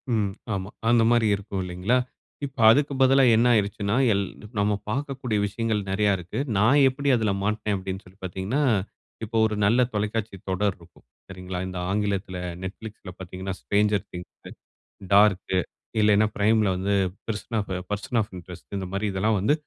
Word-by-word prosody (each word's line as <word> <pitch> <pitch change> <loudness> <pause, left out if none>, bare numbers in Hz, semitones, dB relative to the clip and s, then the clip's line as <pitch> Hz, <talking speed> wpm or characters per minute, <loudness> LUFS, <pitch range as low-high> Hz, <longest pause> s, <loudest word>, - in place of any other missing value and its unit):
ம். 100 -3 0 0.2
ஆமா. 95 0 -3 0.2
அந்த 120 -1 +5
மாரி 120 -2 +3
இருக்கும் 100 -1 -5
இல்லங்களா. 90 +7 0 0.5
இப்போ 135 -3 -6
அதுக்கு 145 +2 +2
பதிலா 135 +1 +6
என்ன 120 +2 +4
ஆகிடுச்சின்னா, 100 0 0 0.2
எல் 100 0 0 0.3
நாம 105 0 +2
பாக்கக்கூடிய 130 -3 -2
விஷயங்கள் 110 0 -1
நெறைய 100 +1 +2
இருக்கு. 90 +7 -6 0.2
நான் 120 +8 +5
எப்படி 140 +2 -2
அதில் 105 -4 0
மாட்னேன் 105 -1 0
அப்படின்னு 95 0 -5
சொல்லி 95 +2 -18
பாத்தீங்கன்னா, 95 - -2 0.6
இப்போ 115 +1 -3
ஒரு 105 -1 -1
நல்ல 115 +5 +3
தொலைக்காட்சி 105 0 -2
தொடர் 95 +1 0
இருக்கும். 85 -5 -20 0.2
சரிங்களா. 90 -1 -6
இந்த 90 -1 -6
ஆங்கிலத்தில 100 -2 -1 0.3
Netflixல 105 0 -8
பாத்தீங்கன்னா 95 +1 -5
ஸ்ட்ரேஞ்சர் 105 0 +1
திங்ஸ், 90 0 -10 0.6
டார்க் 100 -2 +4 0.5
இல்லன்னா, 105 0 +4
Primeல 110 0 +3
வந்து 100 +2 0 0.3
பெர்சன் 110 0 -2 0.3
பெர்சன் 115 +4 -1
ஆஃப் 105 - -6
இன்ட்ரெஸ்ட் 90 +3 -10
இந்த 95 -1 -4
மாதிரி 100 +2 -1
இதெல்லாம் 105 +3 +1
வந்து 105 +10 +3
105 Hz, 150 wpm, -25 LUFS, 95-110 Hz, 0.6 s, பதிலா